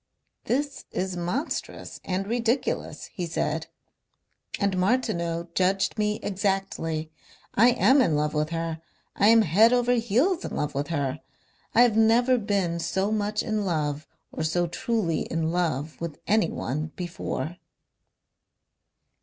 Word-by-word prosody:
"This 280 +2 -1
is 185 0 -3
monstrous 180 - -4
and 190 +1 -2
ridiculous," 235 +3 -1
he 180 -4 -3
said, 160 -1 -2 0.9
"and 200 -2 +1
Martineau 180 -5 0
judged 190 +4 +1
me 210 0 0
exactly. 190 -5 -2 0.4
I 230 +4 +6
am 265 +2 +5
in 165 -11 +2
love 150 0 0
with 155 0 0
her.... 165 -1 -3 0.3
I 205 - +4
am 225 0 +7
head 210 +7 +5
over 245 0 +3
heels 245 - +1
in - - -5
love 150 0 -2
with 140 +1 -2
her. 145 -3 -2 0.6
I 235 - +7
have 235 -3 +3
never 240 +3 +4
been 195 -5 0
so 190 +4 -1
much 210 0 0
in 215 -3 -1
love 150 -5 -1 0.2
or - - -4
so 175 +3 +1
truly 175 -1 -1
in 165 0 -1
love 160 -4 -2
with 170 -3 -4
anyone 155 - 0
before." 175 -3 -4
190 Hz, 135 wpm, -26 LUFS, 165-225 Hz, 0.9 s, am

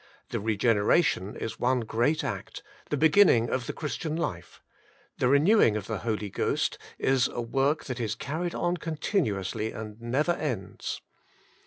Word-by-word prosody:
The - - -2
regeneration 105 - +2
,is 115 - -5
one 125 0 +2
great 120 +7 +1
act, - - -5 0.3
the 150 - 0
beginning 155 - +5
of 130 -2 -1
the - - -1
Christian 155 +2 -3
(life; 85 - -4 0.6
the - - +3
renewing 140 - +5
of 100 - -5
the 110 -3 -3
Holy 105 -3 -2
Ghost - - 0 0.2
is 130 -1 +2
a - - -6
work 135 +6 0
,'that 130 -1 -4
is 110 -2 -1
carried 170 +4 -3
on 175 +1 0
continuously 145 - -1
and 110 0 -8
never 135 +8 +1
ends. 120 - -3
125 Hz, 150 wpm, -28 LUFS, 110-155 Hz, 0.6 s, beginning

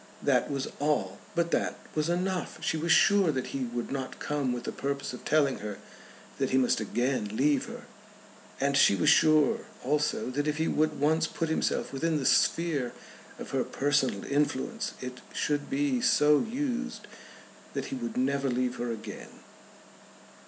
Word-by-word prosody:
That - - +2
was 140 -2 -2
all, 140 -10 0 0.2
but 170 0 +1
that - - 0 0.2
was 155 +1 0
enough. 180 +1 -1
She - - 0
was 160 +1 0
sure 195 -1 +5
that 130 -3 -4
he 135 -2 -1
would 120 0 -4
not 135 -1 -4
come 145 -3 -1
with 120 -1 -3
the - - -3
purpose 140 -1 -3
of 125 - -9
telling 145 -3 +2
her 105 -1 -5 0.6
that - - +1
he 130 - +2
must 130 -1 +3
again 110 -1 -1
leave 145 0 +2
her. - - -8 0.8
And 140 +1 +1
she 135 -7 +6
was 150 - +3
sure 155 -3 +5 0.2
also 145 -1 0
that 145 +3 -1
if 150 -1 0
he 160 +1 0
would 155 0 +1
once 160 +2 +2
put 165 0 -3
himself 160 - -1
within 160 +3 0
the 135 - -3
sphere 150 -7 +2 0.4
of - - -8
her - - +1
personal 135 -7 0
influence 150 - -1
it 125 0 -7
should 145 -1 -1
be 275 -3 0
so 150 -12 +5
used 250 +1 -3 0.7
that - - -2
he - - -1
would 240 -2 -5
never 140 - +1
leave 125 0 -1
her 120 0 -2
again. 110 -2 -7
145 Hz, 170 wpm, -29 LUFS, 130-165 Hz, 0.8 s, she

